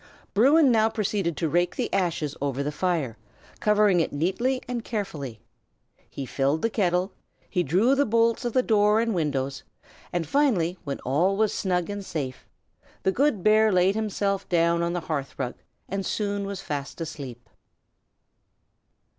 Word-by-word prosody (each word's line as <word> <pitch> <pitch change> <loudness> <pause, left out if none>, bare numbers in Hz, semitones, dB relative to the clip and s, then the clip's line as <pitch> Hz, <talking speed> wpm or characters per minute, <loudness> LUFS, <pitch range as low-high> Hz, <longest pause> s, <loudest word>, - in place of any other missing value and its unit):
Bruin 275 +6 +5
now 220 -1 +4
proceeded 200 -7 -1
to 165 - 0
rake 175 +3 +1
the - - -3
ashes 165 -6 0
over 140 -1 -1
the 145 - -2
fire, 150 -8 -1 0.4
covering 210 -3 +4
it 165 - 0
neatly 195 - 0
and 245 -2 -3
carefully. 150 - -4 0.7
He 135 - -6
filled 140 +4 0
the 230 - +1
kettle; 185 -2 +1 0.4
he 180 - 0
drew 185 - +3
the 280 0 +2
bolts 230 +1 +2
of 240 0 -3
door 210 0 +4
and 230 -1 +1
windows; 140 -5 -1 0.5
and 175 -2 -1
finally, 185 - +1
when 140 -1 -3
all 170 +10 +1
was 215 -1 +2
snug 180 -3 0
and 205 0 -5
safe, 135 -8 -5 0.6
the 190 - +3
good 250 -4 +1
bear 215 0 +5
laid 185 +1 +3
himself 200 -2 -1
down 170 -1 +2
on 170 0 0
the 175 - -2
hearth 145 -4 -4
rug, 125 -2 -2 0.3
and 195 +1 -3
soon 200 0 -2
was 200 -1 -5
fast 145 -3 -5
asleep. 135 -7 -7
185 Hz, 155 wpm, -26 LUFS, 155-215 Hz, 0.7 s, Bruin